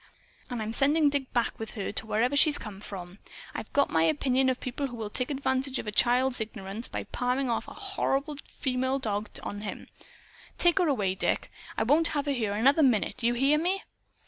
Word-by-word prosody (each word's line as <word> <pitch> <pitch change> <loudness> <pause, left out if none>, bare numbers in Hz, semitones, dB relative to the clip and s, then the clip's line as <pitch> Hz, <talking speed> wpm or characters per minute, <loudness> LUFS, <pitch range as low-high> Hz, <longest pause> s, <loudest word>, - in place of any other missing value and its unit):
And 240 -3 -3
I'm 220 +1 -4
sending 290 +3 +4
Dick 280 -2 -2
back 240 -1 0
with 225 +1 -6
her, 200 - -3
to 220 - -3
where 235 +6 +1
she 305 +2 +7
came 210 -8 -4
from. 190 -2 -8 0.3
I've - - -6
got 280 0 +2
my 160 - +3
opinion 255 - +2
of 255 - -1
people 260 +3 -3
who 245 - -8
will 220 -3 -5
take 250 +2 0
advantage 265 -1 -1
of - - -4
a 210 - -3
child's 245 +3 +2
ignorance, 215 0 -5
by - - -4
palming 250 +1 -1
off 230 - -2
a - - -10
horrid 300 -7 -2
female 260 0 -1
dog 215 -4 -2
on 205 0 -5
him, 210 - -6
too. - - -21 0.5
Take 345 +1 +5
her 355 - +3
away, 205 -10 +1
Dick. 190 - -1 0.3
I - - +2
won't 300 +8 +4
have 285 - 0
her 285 - 0
here 225 -7 -1
another 270 +9 +4
minute. 255 -2 +2
You 240 +1 +2
hear 275 +5 +3
me?" 370 +4 0
250 Hz, 210 wpm, -28 LUFS, 215-280 Hz, 0.5 s, she